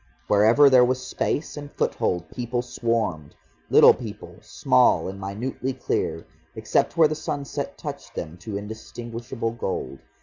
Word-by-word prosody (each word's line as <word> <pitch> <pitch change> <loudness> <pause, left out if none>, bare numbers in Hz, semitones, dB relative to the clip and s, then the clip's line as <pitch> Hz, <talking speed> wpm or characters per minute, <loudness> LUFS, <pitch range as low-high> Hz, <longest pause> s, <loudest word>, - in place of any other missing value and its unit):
Wherever 110 - +5
there 130 -2 +7
was 130 +1 0
space 145 +3 -2
and 145 -1 -8
foothold, 90 -2 -1
people 120 0 -3
swarmed, 115 -11 -2 0.3
little - - +8
people, - - -9
small 65 - +2
and 95 +1 -6
minutely 120 +7 -4
clear, 130 - -2 0.3
except 110 +9 0
where 160 -2 +7
the 155 - -2
sunset 145 -2 -4
touched - - -8
them 80 +2 -5
to 100 +3 -5
indistinguishable 115 +2 -6
gold. 95 -10 -4
115 Hz, 135 wpm, -24 LUFS, 100-130 Hz, 0.3 s, little